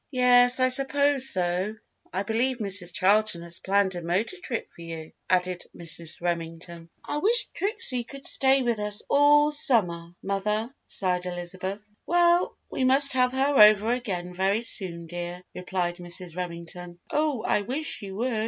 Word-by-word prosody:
"Yes, 250 -1 +4
I 255 0 +2
suppose 275 +1 +5
so! 185 +3 0 0.4
I 190 +2 -3
believe 235 +4 -2
Mrs. 195 -5 +5
Charlton 200 -2 +1
has 170 0 -1
planned 195 0 -1
a 175 - -6
motor 185 - -3
trip 235 -8 -6
for - - -16
you," 165 -1 -9 0.2
added 180 -1 -1
Mrs. 165 0 +2
Remington. 170 0 -6 0.2
"I 295 - -4
wish 460 +8 +3
Trixie 325 - +2
could 275 +3 -13
stay 270 -1 +2
with 235 -3 -2
us 210 0 -1
all 295 +1 +3
summer, 175 - +2
mother," 210 +5 -3
sighed 180 -2 -3
Elizabeth. 185 +3 -7 0.2
"Well, 345 0 +1
we - - -3
must 270 +2 +4
have 250 -1 +1
her 270 -1 +1
over 210 +1 +5
again 185 -8 -6
very 195 +4 -1
soon, 175 -7 -1
dear," 175 +1 -8
replied 180 -1 -4
Mrs. 175 -1 -6
Remington. 175 0 -9
"Oh, 300 -5 -2
I - - -1
wish 260 +6 -6
you 195 -2 -9
would! 245 +5 -3
200 Hz, 155 wpm, -24 LUFS, 175-255 Hz, 0.4 s, suppose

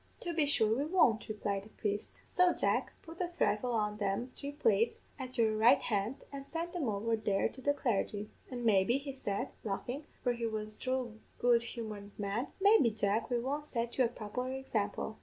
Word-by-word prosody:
"'To 345 - -3
be 310 -3 +2
sure 220 -6 +3
we 270 - 0
won't,' 295 -11 +3
replied 205 -2 -1
the 205 - -14
priest; 205 -1 -2 0.2
'so, 360 -1 +4
Jack, - - +1
put 335 +2 -8
a 355 - +1
thrifle 250 -9 0
on 210 -2 0
them 210 +5 -1
three 280 0 -5
plates 230 -5 +2 0.2
at 255 -1 -6
your 220 -2 +3
right 220 +2 +6
hand, 210 +2 0 0.2
and 275 0 -7
send 335 +2 -3
them 315 -10 -1
over 215 +2 0
here 205 -3 +1
to 260 - -11
the 285 - +3
clargy, 210 -4 -1 0.2
an' 245 -2 -4
maybe,' 210 +3 +4
he 275 0 -5
said, 205 -7 -2
laughin' 245 +7 -3 0.2
for 245 - +2
he 235 -1 -2
was 215 -1 -3
a - - -23
droll 255 -4 -2 0.2
good 240 -1 +4
humoured 215 -4 -7
man 205 +5 -1
'maybe, 400 - +6
Jack, 215 +1 0
we 245 - +2
won't 280 +5 -2
set 235 -5 -2
you - - +7
a - - +4
proper 245 +3 -4
example.' 220 -5 -2
235 Hz, 200 wpm, -33 LUFS, 210-265 Hz, 0.2 s, you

